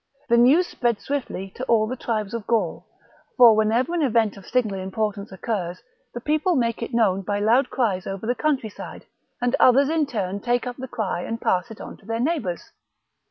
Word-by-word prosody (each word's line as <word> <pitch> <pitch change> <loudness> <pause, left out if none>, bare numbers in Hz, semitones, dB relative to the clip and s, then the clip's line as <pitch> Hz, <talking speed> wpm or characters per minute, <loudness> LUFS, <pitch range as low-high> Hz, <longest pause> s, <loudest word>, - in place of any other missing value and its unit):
The 235 - +5
news 275 +10 +5
spread 240 -9 -1
swiftly 245 -9 -4
to 255 - -6
all 225 -4 +3
the 245 +4 -4
tribes 215 -4 -3
of 230 -3 -5
Gaul; 220 -8 -1 0.5
for 235 -4 +8
whenever 225 +8 +1
an 345 - 0
event 230 -6 +2
of 195 -2 -13
signal 215 -6 0
importance 200 +2 -3
occurs, 190 -3 -3 0.4
the - - -3
people 310 +7 +1
make 235 -3 0
it 230 - -4
known 210 -5 +2
by 205 +2 -2
loud 235 +6 +3
cries 200 -8 -1
over 195 +2 -5
the 245 - +1
country 270 -5 -1
side, - - -10 0.3
and 245 +2 +1
others 270 +3 +5
in 315 -2 +1
turn 200 -6 -3
take 240 +4 0
up 245 -1 -5
the 260 0 -6
cry 205 -7 -3
and 225 +5 -4
pass 180 -6 0
it 225 - -10
on - - -9
to 195 - -21
their 225 0 -2
neighbours. 240 - -2
230 Hz, 205 wpm, -23 LUFS, 205-255 Hz, 0.5 s, for